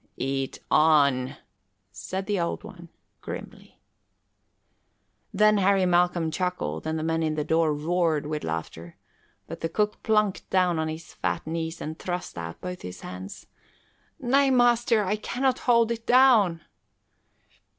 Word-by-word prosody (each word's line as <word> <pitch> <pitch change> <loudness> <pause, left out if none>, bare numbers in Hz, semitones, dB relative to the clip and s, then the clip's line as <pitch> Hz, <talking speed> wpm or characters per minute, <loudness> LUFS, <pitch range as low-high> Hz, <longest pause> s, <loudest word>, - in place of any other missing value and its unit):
"Eat 135 0 -2
on," 140 -4 +3 0.6
said 190 - -5
the 205 -1 -1
Old 170 +3 -2
One 180 -6 -12 0.3
grimly. - - -9 1.5
Then 215 0 +4
Harry 195 -1 +3
Malcolm 175 -2 +2
chuckled 180 -1 -3
and 160 0 -1
the 155 - -3
men 165 0 0
in 155 -1 0
the 150 - -1
door 160 +1 +2
roared 160 0 0
with 150 0 -4
laughter, 80 +1 -6 0.5
but - - -8
the 165 - -2
cook 210 +4 -1
plunked 210 -3 0
down 180 -3 +2
on 160 - -1
his 160 +1 -7
fat - - -3
knees 160 +1 -4
and 155 +1 -6
thrust 180 0 -4
out 85 -1 -7
both 180 0 -6
his 90 - -8
hands. 90 +2 -9 0.7
"Nay, 275 +1 +3
master, 240 -3 +3
I 205 +2 -1
cannot 255 +4 -1
hold 235 -1 +4
it 230 0 -5
down!" 230 -10 +5
175 Hz, 140 wpm, -26 LUFS, 155-210 Hz, 1.5 s, down